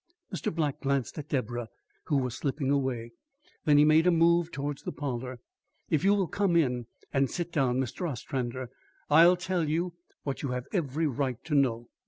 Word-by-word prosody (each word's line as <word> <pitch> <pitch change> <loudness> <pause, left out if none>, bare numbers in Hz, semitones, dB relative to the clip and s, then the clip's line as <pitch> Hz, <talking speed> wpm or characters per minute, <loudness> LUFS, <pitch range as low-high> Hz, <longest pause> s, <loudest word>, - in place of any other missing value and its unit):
Mr. 185 - -2
Black 155 -4 -1
glanced 140 -1 -1
at 150 0 -8
Deborah, 120 -3 -2 0.4
who 145 - +1
was 125 -3 -1
slipping 140 -1 -1
away. 130 -4 -1 0.5
Then 150 -1 +5
he 150 - +7
made 155 +3 +5
a - - +6
move 170 0 +3
towards 140 -1 -4
the - - -4
parlour. 130 -3 -4 0.5
"If 155 0 +2
you 200 +1 +5
will 195 -2 +2
come 190 0 +1
in 125 -7 +2 0.3
and 135 -1 +2
sit 175 -1 -3
down, 130 -5 +1
Mr. 130 +7 -2
Ostrander, 130 -1 -4 0.4
I'll 170 +4 +7
tell 180 -3 -1
you 170 +3 0 0.3
what 140 -2 -3
you 140 - -2
have 125 0 -3
every 160 -4 0
right 130 -3 -1
to 160 - -4
know." 120 -5 +2
140 Hz, 185 wpm, -29 LUFS, 130-165 Hz, 0.5 s, he